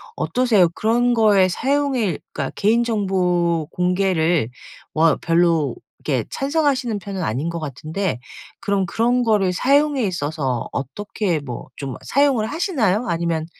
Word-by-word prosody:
어떠세요? 195 +2 +2
그런 240 +3 +2
거에 205 -5 +4
사용일 260 - 0
그러니까 140 -3 -3
개인 225 +4 +2
정보 180 -7 0
공개를 180 - +1 0.4
워 160 -1 +3
별로 165 -5 +2 0.2
이렇게 130 -7 -1
찬성하시는 275 -5 0
편은 195 -1 -5
아닌 145 +2 -2
것 170 0 -4
같은데 155 +3 -3 0.4
그럼 200 -3 0
그런 245 +4 +1
거를 205 -5 +2
사용에 280 +3 +2
있어서 145 - -2
어떻게 180 - -2
뭐 125 -4 -7
좀 135 -3 -5
사용을 270 -6 +2
하시나요? 250 - 0
아니면 165 -2 -1
190 Hz, 300 characters per minute, -21 LUFS, 165-235 Hz, 0.4 s, 거에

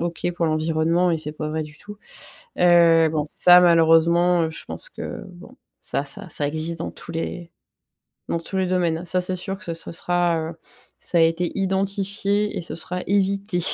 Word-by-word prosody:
OK 170 +1 -2
pour 170 - 0
l'environnement 160 +3 +1
et 165 - 0
c'est 150 -1 -5
pas 155 0 -5
vrai 155 0 -2
du 150 0 -13
tout. 205 0 -10 0.6
Heu, 170 -2 +5
bon, 150 -2 -1
ça, 180 +3 +6
malheureusement, 170 0 +4
je 160 - -8
pense - - -7
que, - - -7
bon, 185 +9 -15 0.2
ça 140 - -2
ça 140 - -2
ça 145 - 0
existe 160 +2 -2
dans - - -4
tous - - -10
les 165 +1 -5 0.8
dans 170 - -1
tous 190 +3 -5
les 185 - +1
domaines. 175 -2 0
Ça, 185 +2 +2
c'est 180 +1 0
sûr 190 +2 -4
que 175 -5 -6
ça 165 - -6
sera, 175 0 0
heu, - - -15 0.5
ça 175 - -1
a - - +5
été 165 +1 +1
identifié 195 +2 -1
et - - -3
ce - - -6
sera 180 +2 -3
évité. 195 -1 +1
175 Hz, 190 wpm, -22 LUFS, 165-185 Hz, 0.8 s, ça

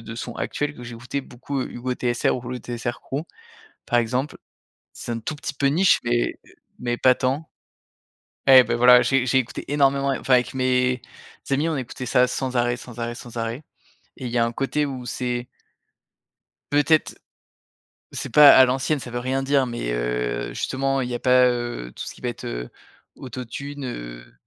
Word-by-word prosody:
de 115 0 -8
sons 115 +1 -6
actuels 145 0 -2
que 120 - -11
j'écoutais 120 +3 -5
beaucoup: 130 +2 -5
Hugo 125 0 -4
TSR, 120 -1 0
ou 125 -1 -6
le 125 - -4
TSR 120 0 -4
crew, 145 +4 -4 0.6
par 120 - +3
exemple. 125 +5 -2 0.6
C'est 120 - -6
un 115 - -3
tout 150 +7 -4
petit 145 - -5
peu 140 0 +1
niche 175 +7 +4
mais, 120 0 +1
heu, - - -20 0.3
mais 120 -1 -2
pas 130 -1 +5
tant. 135 +5 -2 1.0
Et 130 -1 +9
bah - - -1
voilà, 125 +1 +7
j'ai 130 +1 +2
j'ai 130 - +3
écouté 125 -3 -2
énormément, 140 -1 +2
a 135 - 0
enfin 130 - +1
avec 125 +1 +2
mes 125 -1 +1 0.5
amis, 145 +4 +2
on 160 - -1
écoutait 130 0 -6
ça 125 0 +4
sans 130 0 -3
arrêt, 120 0 +2
sans 125 -1 -11
arrêt, 120 0 -3
sans 120 0 -10
arrêt. 115 +5 -3 0.5
Et 130 - -7
il 120 - -4
y 120 - 0
a 115 - +4
un 115 - -2
côté 145 +4 0
où 130 -2 -6
c'est 120 0 -3 1.2
peut-être, 145 +2 +2 0.9
c'est - - -5
pas 150 -1 +9
à 130 - +8
l'ancienne, 135 +3 0
ça 125 - -8
veut 120 - -4
rien 130 +2 -1
dire, 135 0 +2
mais, 120 - -3
heu, - - -2
justement, 135 0 -1
il 125 - -3
y 120 - -2
a - - -3
pas, 125 0 +5
heu, 120 - -3
tout - - -6
ce - - -7
qui - - -18
va 125 - -1
être, 120 - -8
heu, - - -5 0.5
Auto-Tune, 135 +3 -7
heu, - - -7
125 Hz, 195 wpm, -23 LUFS, 120-135 Hz, 1.2 s, Et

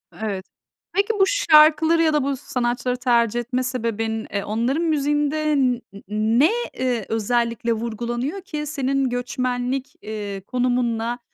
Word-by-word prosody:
Evet. 200 -3 -4 0.5
Peki, 400 +2 +2
bu - - +7
şarkıları 320 -7 +5
ya 315 -1 +3
da 295 -3 +2
bu 275 -1 -1
sanatçıları 250 0 -2
tercih 240 -2 +2
etme 250 +2 -2
sebebin, 225 -3 -2
eee, 200 - -1
onların 235 +9 0
müziğinde 295 0 +1
n 255 -3 +3
n 240 - -11 0.6
ne, 310 +9 +5 0.2
eee, 245 -5 -1
özellikle 230 +1 0
vurgulanıyor 240 - -3
ki 305 -5 -5
senin 275 -2 0
göçmenlik, 250 +1 -2
eee, 205 -2 -5
konumunla, 245 -1 0
250 Hz, 130 wpm, -22 LUFS, 235-295 Hz, 0.6 s, bu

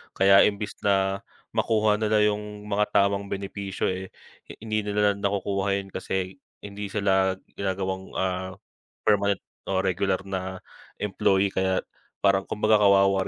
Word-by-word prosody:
Kaya 95 0 +6
imbis 105 0 -4
na 95 0 +2 0.3
makuha 105 -1 +2
nila 110 -1 +3
yung 105 0 -2
mga 105 +1 +2
tamang 100 0 +3
benepisyo, 100 -1 -3
eh, 95 +1 -5 0.6
hindi 110 -1 -2
na 100 - -2
nila 105 0 +4
nakukuha 100 0 0
yun 100 -1 -5
kasi 95 +3 -3 0.2
hindi 100 0 -6
sila 95 -2 +2 0.2
ginagawang, 95 -1 -3
ah, 95 0 -2 0.5
permanent 100 -1 +2 0.2
o 95 -1 0
regular 95 0 0
na 95 -1 -5 0.4
employee. 95 -1 +2
Kaya 95 0 0 0.4
parang 100 -1 +3
kumbaga, 110 0 +3
kawawa 100 -1 +4
100 Hz, 130 wpm, -26 LUFS, 95-105 Hz, 0.6 s, Kaya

